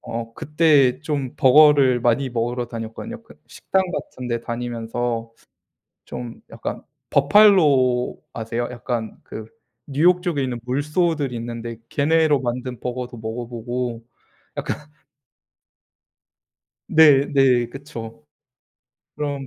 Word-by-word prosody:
어 115 0 -6
그때 150 -4 +3
좀 145 -5 -3
버거를 140 -2 +6
많이 120 +3 +1
먹으러 120 +1 -2
다녔거든요. 115 - -7
그 - - -18
식당 190 0 -1
같은데 120 -5 -4
다니면서 115 -1 -4 0.7
좀 120 -2 -8
약간 - - -5 0.3
버팔로 140 -7 +4
아세요? 115 +1 -3
약간 120 -2 -4
그 110 - -8 0.4
뉴욕 175 +6 +3
쪽에 165 -7 -1
있는 125 -2 -3
물소들이 145 +1 0
있는데 115 0 -6
걔네로 155 0 +2
만든 125 -1 -4
버거도 125 -1 -5
먹어 110 +2 -5
보고 120 0 -4 0.5
약간 - - -2 2.1
네 145 -3 +6
네. 130 -4 +3
그쵸. 115 - -9 0.9
그럼 140 -2 -3
125 Hz, 220 characters per minute, -22 LUFS, 120-145 Hz, 2.1 s, 버거를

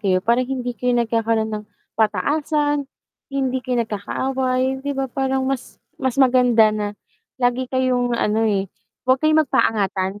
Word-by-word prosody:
kayo 190 -3 +2
parang 235 +3 +3
hindi 250 -2 -3
kayo 250 0 0
nagkakaroon 225 -1 0
ng 215 0 -4 0.3
pataasan, 290 +5 +1 0.5
hindi 265 -1 0
kayo 250 -2 0
nagkakaaway, 260 +5 -1
di 285 - -1
ba, 270 -1 -2
parang 265 +1 -1
mas 270 -2 -4 0.2
mas 260 -1 -2
maganda 250 -4 +5
na, 210 -1 -2 0.5
lagi 245 +1 +1
kayong 250 -2 +1
ano, 220 0 +1
eh, 200 -3 0 0.4
huwag 260 0 +4
kayo 310 - +4
magpaangatan, 200 -8 0
250 Hz, 140 wpm, -21 LUFS, 220-265 Hz, 0.5 s, maganda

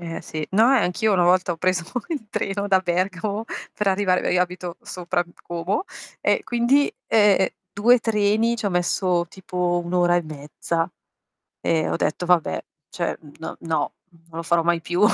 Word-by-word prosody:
Eh, 165 -1 -5
sì. 155 -1 -5
No, 225 +6 +5
eh, 270 - +5
anch'io 210 +4 +1
una 180 -2 +3
volta 180 +1 +3
ho 170 - -1
preso 185 +1 +1 0.3
il 285 -10 -4
treno 200 +1 -2
da 190 -1 +5
Bergamo 185 +4 -1 0.3
per 210 - 0
arrivare 190 -1 +1
io 180 - +3
abito 180 -1 -3
sopra 175 0 -2 0.2
Como 175 - -2 0.4
e - - +1
quindi, 250 +4 +2 0.2
ehm, 205 -3 +4 0.2
2 240 +5 +5
treni 220 +1 +2
ci 220 - -3
ho - - +1
messo 180 0 +1
tipo 180 -1 -2
1 175 - -6
ora 175 -1 +4
e 175 - +2
mezza 155 +2 -3 0.7
e 160 -1 +1
ho - - -1
detto: 160 +4 -1
"Vabbè, 165 - +2 0.2
cioè - - -2
n 145 - -14
no, 160 - -6
non 160 -3 +1 0.4
lo 165 +1 -4
farò 165 0 +2
mai 170 0 +2
più". 175 +2 -2
180 Hz, 175 wpm, -23 LUFS, 170-205 Hz, 0.7 s, No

